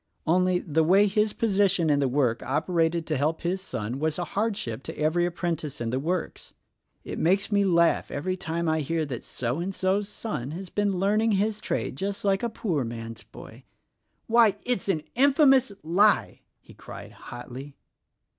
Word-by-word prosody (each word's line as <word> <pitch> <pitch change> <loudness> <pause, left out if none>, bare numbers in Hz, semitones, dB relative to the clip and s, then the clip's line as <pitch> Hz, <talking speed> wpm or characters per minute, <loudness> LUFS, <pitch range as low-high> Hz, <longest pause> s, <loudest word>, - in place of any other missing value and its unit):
Only, 180 +2 +3
the 160 -2 0
way 190 +6 +5
his 210 +1 +1
position 195 -6 +2
in 145 - +3
the 140 - +2
world 125 -3 +1
operated 165 +4 0
to 155 -2 -1
help 155 +4 0
his 185 +2 -1
son 120 - -4
was 155 0 -1
a 175 - -1
hardship 200 - -2
to - - -8
every 165 +3 +1
apprentice 170 -4 -3
in 115 -1 -2
the 130 - 0
works. 170 +5 -3 0.5
It - - -6
makes 195 +5 +2
me 200 -1 +3
laugh 170 -3 +3
every 185 +6 -2
time 170 -2 -3
I 160 0 +2
hear 160 +2 -1
that 130 -5 -6
So 125 +4 -3
and 185 +2 -3
So's 195 +2 0
son 205 - -4
has 190 -1 -8
been 205 -2 0
learning 210 +4 +2
his 210 +2 0
trade 130 - -3
just 200 +3 -3
like 195 -1 +2
a 235 - -1
poor 175 - -2
man's 115 -1 -7
boy. - - -13 0.6
Why, 225 -3 +4
it's 245 -6 -1
an 160 -5 0
infamous 270 -2 +4
lie!" 195 +7 +2 0.2
he - - -17
cried - - -10
hotly. 125 +3 -9
175 Hz, 175 wpm, -26 LUFS, 150-200 Hz, 0.6 s, way